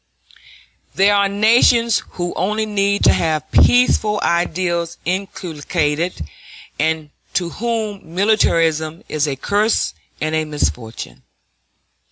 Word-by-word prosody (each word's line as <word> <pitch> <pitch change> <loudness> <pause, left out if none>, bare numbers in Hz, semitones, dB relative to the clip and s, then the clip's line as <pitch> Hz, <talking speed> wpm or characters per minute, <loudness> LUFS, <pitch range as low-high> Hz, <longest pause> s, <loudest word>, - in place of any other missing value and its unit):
There 200 +1 +4
are 200 -1 +3
nations 230 +2 +3
who 175 -1 -3
only 215 +3 -1
need 200 -1 0
to - - +6
have 160 -2 -1
peaceful 215 -4 +4
ideals 170 0 -1
inculcated, 165 - -2 0.5
and 160 -1 -1 0.2
to 175 -2 0
whom 215 -7 -4
militarism 165 -6 +1
is 155 -1 -1
a 140 - -2
curse 205 - 0 0.3
and 155 +1 -2
a 155 0 +1
misfortune. 125 -7 -4
175 Hz, 105 wpm, -18 LUFS, 155-205 Hz, 0.5 s, to